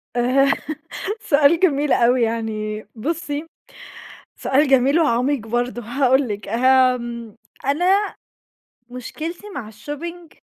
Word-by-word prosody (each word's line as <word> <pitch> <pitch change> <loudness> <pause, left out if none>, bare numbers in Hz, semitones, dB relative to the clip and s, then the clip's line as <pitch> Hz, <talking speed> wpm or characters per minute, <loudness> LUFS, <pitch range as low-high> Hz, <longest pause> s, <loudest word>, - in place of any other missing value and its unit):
آآ 255 +3 +3 0.7
سؤال 295 -2 +4
جميل 295 -5 +2
أوي 245 +1 +3
يعني 215 -2 -2
بُصّي، 300 +4 -3 0.9
سؤال 285 +3 +2
جميل 270 +3 +4
وعميق 255 -4 +1
برضه. 240 +1 -1
هاقول 260 +3 +2
لِك، 205 -1 -5
آمم، 240 -1 +2 0.3
أنا 365 +9 +2 0.7
مُشكلتي 320 - -7
مع 220 -6 -6
الshopping 320 +9 -8
260 Hz, 95 wpm, -21 LUFS, 235-295 Hz, 0.9 s, سؤال